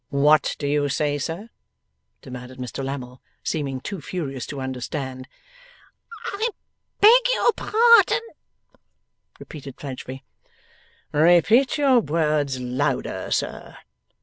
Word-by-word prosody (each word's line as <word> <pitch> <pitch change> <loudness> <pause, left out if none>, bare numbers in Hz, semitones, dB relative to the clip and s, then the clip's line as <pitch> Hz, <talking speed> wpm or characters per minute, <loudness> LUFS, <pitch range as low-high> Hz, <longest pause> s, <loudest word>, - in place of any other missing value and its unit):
'What 145 +2 +3
do 145 - -5
you 145 0 +1
say, 145 +1 0
sir?' 175 - -5 0.7
demanded 125 0 -9
Mr 125 +1 -5
Lammle, 130 -2 -6 0.2
seeming 140 -4 -2
too 190 +5 -6
furious 135 -9 -5
to 140 - -6
understand. 130 0 -5 1.1
'I 440 +4 0 0.5
beg 465 +4 +8
your 480 - +3
pardon,' 460 -1 +5 1.2
repeated 140 -5 -10
Fledgeby. 130 -1 -7 0.9
'Repeat 175 - +4
your 275 -4 +4
words 150 - 0
louder, 130 +2 -2
sir. - - -3
145 Hz, 100 wpm, -23 LUFS, 130-180 Hz, 1.2 s, beg